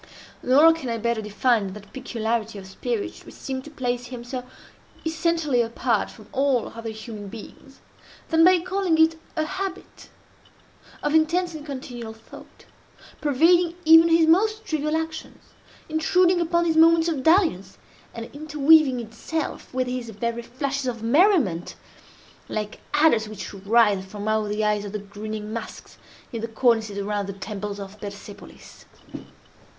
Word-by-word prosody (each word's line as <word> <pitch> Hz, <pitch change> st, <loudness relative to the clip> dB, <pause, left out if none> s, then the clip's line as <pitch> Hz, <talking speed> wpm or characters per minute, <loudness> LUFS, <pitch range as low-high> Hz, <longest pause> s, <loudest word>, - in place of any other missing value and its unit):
Nor 295 Hz, +6 st, +6 dB
can 305 Hz, -6 st, -6 dB
I 230 Hz, -, -1 dB
better 235 Hz, 0 st, -1 dB
define 210 Hz, -1 st, 0 dB
that 205 Hz, -1 st, -13 dB
peculiarity 230 Hz, -4 st, -3 dB
of 195 Hz, -, -9 dB
spirit 385 Hz, -, -4 dB
which -, -, -13 dB
seemed 260 Hz, -1 st, -5 dB
to -, -, -9 dB
place 245 Hz, -4 st, -3 dB
him 245 Hz, -1 st, -8 dB
so 250 Hz, +1 st, -5 dB, 0.6 s
essentially 320 Hz, -5 st, +1 dB
apart 230 Hz, -1 st, 0 dB
from 215 Hz, -3 st, -15 dB
all 270 Hz, -4 st, +1 dB
other 230 Hz, 0 st, -7 dB
human 215 Hz, -1 st, -8 dB
beings, 230 Hz, +5 st, -12 dB, 0.5 s
than 325 Hz, -1 st, +4 dB
by 360 Hz, 0 st, +6 dB
calling 365 Hz, -2 st, 0 dB
it 320 Hz, 0 st, +4 dB, 0.2 s
a 315 Hz, -1 st, 0 dB
habit 380 Hz, +2 st, -6 dB, 0.9 s
of 295 Hz, -, 0 dB
intense 340 Hz, +3 st, +2 dB
and 310 Hz, -2 st, -8 dB
continual 250 Hz, -5 st, -7 dB
thought, 220 Hz, 0 st, -15 dB, 0.6 s
pervading 335 Hz, +4 st, +3 dB
even 325 Hz, +1 st, +8 dB
his 330 Hz, 0 st, +5 dB
most 430 Hz, +7 st, +2 dB
trivial 305 Hz, 0 st, -1 dB
actions—intruding 325 Hz, +2 st, -1 dB
upon 340 Hz, +1 st, +1 dB
his 325 Hz, -1 st, +1 dB
moments 330 Hz, 0 st, +6 dB
of 315 Hz, -5 st, -1 dB
dalliance—and 230 Hz, -, 0 dB
interweaving 300 Hz, -2 st, +4 dB
itself 235 Hz, +8 st, -5 dB
with 255 Hz, 0 st, -1 dB
his 250 Hz, -2 st, -4 dB
very 235 Hz, +2 st, -3 dB
flashes 275 Hz, +2 st, -3 dB
of 230 Hz, -3 st, -4 dB
merriment—like 225 Hz, -, -1 dB, 0.2 s
adders 265 Hz, -8 st, +3 dB
which 210 Hz, -1 st, -7 dB
writhe 200 Hz, 0 st, +3 dB
from 205 Hz, +2 st, -7 dB
out 215 Hz, -1 st, +1 dB
the 210 Hz, +1 st, -1 dB
eyes 210 Hz, -1 st, +1 dB
of 205 Hz, 0 st, -7 dB
the -, -, -1 dB
grinning 210 Hz, +1 st, -7 dB
masks 230 Hz, -, -8 dB, 0.3 s
in 230 Hz, -, -3 dB
the 230 Hz, -, -3 dB
cornices 225 Hz, -3 st, +1 dB
around 200 Hz, 0 st, -2 dB
the 195 Hz, -, -5 dB
temples 205 Hz, +1 st, -6 dB
of 200 Hz, +1 st, -9 dB
Persepolis. 200 Hz, 0 st, -11 dB
250 Hz, 145 wpm, -24 LUFS, 215-320 Hz, 0.9 s, even